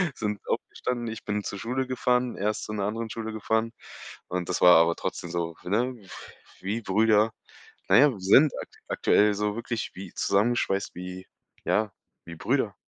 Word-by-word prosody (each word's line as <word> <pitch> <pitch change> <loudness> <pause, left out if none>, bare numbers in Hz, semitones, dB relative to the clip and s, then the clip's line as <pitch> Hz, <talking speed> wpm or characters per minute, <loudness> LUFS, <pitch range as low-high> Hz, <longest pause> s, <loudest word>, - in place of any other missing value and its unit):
sind 105 -2 -2
aufgestanden, 120 -2 -3
ich 115 0 -7
bin 105 0 -2
zur 100 - -5
Schule 130 +3 -2
gefahren, 125 -1 0
er 105 +2 +1
ist - - -6
zu - - -6
'ner 100 -2 -1
anderen 110 +2 -3
Schule 110 0 -5
gefahren 110 +1 0 0.6
und 90 -1 -3
das 90 - -1
war 90 0 +9
aber 85 +1 +4
trotzdem 85 - -5
so, 85 -1 -2
ne, 120 +7 0 0.7
wie 105 +5 -2
Brüder. 110 +2 +3 0.6
Na - - +6
ja, 145 +1 +7
wir 105 - -8
sind 130 +11 +6 0.4
aktuell 105 0 +3
so 105 0 -1
wirklich 115 -1 -4
wie 95 - -9
zusammenschweißt 100 -1 +1
wie 90 +1 -7 0.4
ja, 110 -1 +1 0.3
wie 85 0 -8
Brüder. 115 - 0
105 Hz, 170 wpm, -27 LUFS, 95-115 Hz, 0.7 s, war